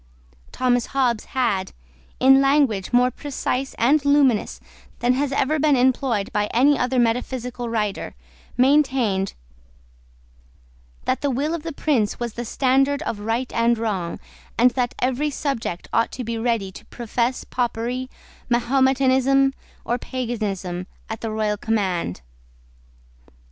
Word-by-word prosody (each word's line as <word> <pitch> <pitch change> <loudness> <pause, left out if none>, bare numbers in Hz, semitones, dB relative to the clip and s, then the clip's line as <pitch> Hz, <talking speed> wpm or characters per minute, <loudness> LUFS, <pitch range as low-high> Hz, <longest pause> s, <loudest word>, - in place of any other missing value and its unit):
Thomas 245 -2 +1
Hobbes 240 -5 +1
had, 220 -8 -1 0.5
in 270 +1 +6
language 275 -9 +2
more 250 +1 +4
precise 270 -1 -3
and 280 +6 +3
luminous 285 -6 +2 0.4
than 245 +1 +2
has 280 +2 -1
ever 290 +3 +1
been 295 -1 +4
employed 250 -4 +1
by 210 0 +1
any 275 +7 +4
other 255 0 0
metaphysical 245 0 -1
writer, 210 -3 -2 0.4
maintained 255 -8 +2 1.7
that - - 0
the 285 - +1
will 280 +5 -1
of 335 - -3
the 330 +1 -5
prince 270 -8 0
was 240 -2 -3
the 240 - -5
standard 270 +4 +1
of 225 - -3
right 225 +4 -2
and 235 0 +2
wrong, 195 -7 -2 0.4
and 245 +2 +5
that 245 -1 -1
every 260 +4 0
subject 275 - -3
ought 230 - +2
to 255 - -5
be 230 0 -3
ready 225 -4 -1
to - - -12
profess 240 +1 -2
Popery, 245 +1 -2 0.4
Mahometanism, 265 +2 +3 0.3
or 240 +2 -1
Paganism, 205 -9 -4 0.2
at 220 - -5
the 225 - -3
royal 215 -1 -1
command. 190 - -1
245 Hz, 130 wpm, -22 LUFS, 225-270 Hz, 1.7 s, in